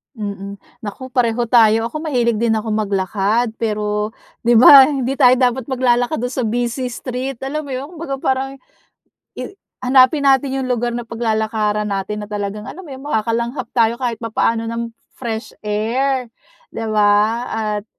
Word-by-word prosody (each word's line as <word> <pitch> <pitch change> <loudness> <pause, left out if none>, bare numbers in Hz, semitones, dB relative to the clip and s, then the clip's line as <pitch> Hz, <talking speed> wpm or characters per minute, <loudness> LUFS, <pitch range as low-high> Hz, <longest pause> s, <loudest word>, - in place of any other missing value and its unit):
Mm, 200 -2 -6 0.2
naku 250 +4 -8
pareho 240 -1 +1
tayo, 225 -1 +4
ako 310 - -4
mahilig 235 -5 +1
din 230 -1 +2
akong 220 0 -2
maglakad 205 +3 0
pero, 210 -1 -2 0.3
'di 240 - +5
ba 265 +3 +9
hindi 270 -3 -1
tayo 250 +1 +7
dapat 250 0 0
maglalakad 245 -2 +1
dun 245 - -2
sa 250 -4 -1
busy 240 +2 -1
street, 255 +2 -4
alam 295 +2 -3
mo - - -7
yun 280 +6 -6
kumbaga 325 -5 -5
parang 270 0 -1 0.8
i - - -6 0.3
hanapin 265 +3 +4
natin 270 0 +3
yung 255 - -3
lugar 240 -1 0
na 235 -1 -5
paglalakaran 215 -2 -1
natin 200 +2 -3
na 210 - -7
talagang 210 0 -4
alam 380 +1 -9
mo 295 - -12
'yon 265 - -9
makakalanghap 235 0 -1
tayo 230 -1 +2
kahit 235 -3 -3
papaano 230 0 0
ng 230 0 -4 0.2
fresh 230 -2 -5
air, 245 +5 0 0.4
'di 225 - -6
ba? 205 -1 +4 0.3
At 210 -2 -2
235 Hz, 160 wpm, -19 LUFS, 215-260 Hz, 0.8 s, ba